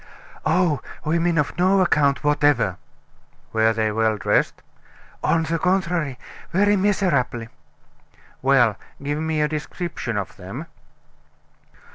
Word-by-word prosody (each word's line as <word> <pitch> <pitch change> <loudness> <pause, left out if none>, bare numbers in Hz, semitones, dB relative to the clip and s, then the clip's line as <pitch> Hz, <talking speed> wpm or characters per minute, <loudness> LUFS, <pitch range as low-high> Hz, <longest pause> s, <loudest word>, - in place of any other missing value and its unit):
"Oh! 160 -2 +2 0.2
women 165 +2 +1
of 150 - 0
no 190 +2 +4
account 150 -6 +2
whatever!" 145 - +2 0.8
"Were 110 0 +4
they 110 -1 0
well 110 0 +1
dressed?" 90 - 0 0.6
"On 165 -1 +2
the 165 +1 -1
contrary, 175 -6 0 0.3
very 205 +3 +3
miserably." 175 - 0 0.9
"Well, 125 -6 +4 0.3
give 145 +1 -2
me 160 -1 -1
a 150 - +3
description 150 - -4
of 100 -2 -5
them." 100 - -7
150 Hz, 110 wpm, -22 LUFS, 120-170 Hz, 0.9 s, no